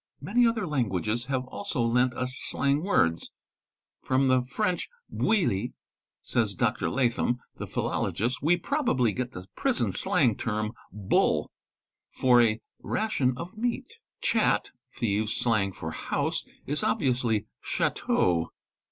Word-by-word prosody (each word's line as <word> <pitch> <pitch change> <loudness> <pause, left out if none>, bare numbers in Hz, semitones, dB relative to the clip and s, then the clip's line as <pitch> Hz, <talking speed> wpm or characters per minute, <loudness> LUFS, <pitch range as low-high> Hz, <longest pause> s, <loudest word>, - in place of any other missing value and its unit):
Many 240 +4 +3
other 225 -3 0
languages 115 - -1
have 130 -1 -1
also 160 +2 -5
lent 120 +1 +2
us 130 +1 -3
slang 140 +2 +1
words. 85 - +1 0.7
"From 130 +1 +2
the 130 0 +4
French 180 +9 -1 0.2
bowilli"' 125 - +1 0.5
says 110 -5 0
Dr. 120 -1 0
Latham, 120 -1 +1 0.2
the - - -5
jhilologist, 120 +4 -1
'we 165 +5 +3
probably 235 - +1
get 125 -1 -3
the 90 0 -8
prison - - 0
slang 115 -4 +2
term 110 -2 -2 0.2
'bull' 100 0 +1 0.6
for 125 -2 +4
a 110 -1 +2 0.2
ration 140 - 0
of 175 - -7
meat. 245 - -3 0.2
Chat, - - +2 0.2
thieves' 110 -1 -1
slang 110 -5 +1
for 80 -3 -6
house, - - -2 0.2
is 145 +2 -1
obviously 120 -5 +1 0.2
chdteau. 85 -2 +1
125 Hz, 125 wpm, -28 LUFS, 110-150 Hz, 0.7 s, the